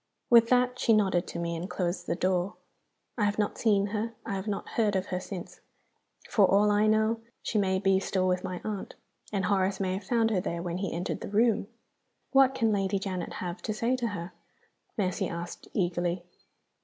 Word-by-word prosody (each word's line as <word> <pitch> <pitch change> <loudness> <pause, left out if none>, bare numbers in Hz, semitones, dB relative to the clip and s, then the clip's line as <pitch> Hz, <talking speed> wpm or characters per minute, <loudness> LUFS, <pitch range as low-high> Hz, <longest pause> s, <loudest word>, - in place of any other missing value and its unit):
With 230 -1 +8
that 250 0 +3
she 225 - +4
nodded 190 -4 +2
to - - -6
me, 170 0 -2
and 175 +4 -5
closed 180 -1 -2
the - - 0
door. 185 +2 0 0.6
I 210 - +3
have 205 0 0
not 210 -1 -1
seen 205 -3 +3
her, 225 +2 -2
I 225 - -3
have 195 +2 -4
not 205 -2 -3
heard 210 -3 +1
of 190 0 0
her, 180 - 0
since. 185 -1 -8 0.7
For 200 -4 +4
all 205 +2 +4
I 210 +1 +3
know, 220 +1 +2 0.2
she 215 - 0
may 190 -1 +2
be 195 0 +3
still 190 -1 0
with 180 0 +1
my 185 -2 -4
aunt, 210 -3 -5 0.4
and 200 -2 0
Horace 190 -1 +1
may 185 -2 0
have 190 +2 -4
found 225 +2 +2
her 190 -4 +1
there 170 -1 -3
when 175 0 -3
he 195 -2 -2
entered 175 +2 -3
the - - -5
room." 215 0 +2 0.6
"What 270 -1 +5
can 225 -2 +2
Lady 195 -1 +1
Janet 190 -2 -4
have 175 +1 -5
to 215 - -3
say 235 +4 +1
to 240 -2 -1
her?" 180 -4 -5 0.6
Mercy 185 -4 0
asked, 170 +1 -6
eagerly. 175 -2 0
195 Hz, 205 wpm, -29 LUFS, 185-215 Hz, 0.7 s, With